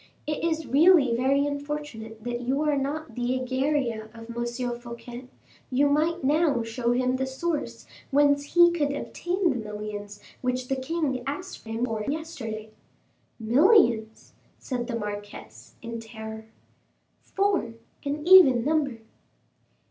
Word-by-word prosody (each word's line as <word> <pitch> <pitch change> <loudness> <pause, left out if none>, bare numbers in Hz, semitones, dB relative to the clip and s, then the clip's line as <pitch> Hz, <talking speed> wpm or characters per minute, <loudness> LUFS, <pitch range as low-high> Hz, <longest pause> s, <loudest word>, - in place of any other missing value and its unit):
It 300 +1 -3
is 320 -1 0
really 280 -1 +5
very 275 +3 +2
unfortunate 285 -7 -5
that 240 0 -3
you 265 +4 0
are 300 -1 +2
not 280 -1 -3
the 245 +2 -1
Egeria 260 -3 -1
of 230 +1 -9
M. 240 0 -3
Fouquet; 240 +1 -9 0.4
you 275 +3 +3
might 315 +3 +1
now 290 -3 +2
show 235 +1 -1
him 255 +1 +1
the 265 0 -1
source 300 +4 -3 0.2
whence 285 +1 +2
he 345 0 +8
could 295 -4 0
obtain 360 +5 -2
the - - -8
millions 210 -1 -6 0.2
which 250 0 -2
the 270 - +1
king 265 -1 -2
asked 365 +4 -6
him 225 +2 -1
for 220 -3 -3
yesterday." 255 -9 -5 0.7
"Millions!" 235 - +3 0.2
said 245 -3 -4
the 240 - -3
marquise, 205 - -8
in 230 0 -5
terror. 220 -1 -8 0.7
"Four 390 - 0 0.3
an 295 +3 -3
even 275 -11 +8
number." 285 -6 0
255 Hz, 135 wpm, -26 LUFS, 230-295 Hz, 0.7 s, he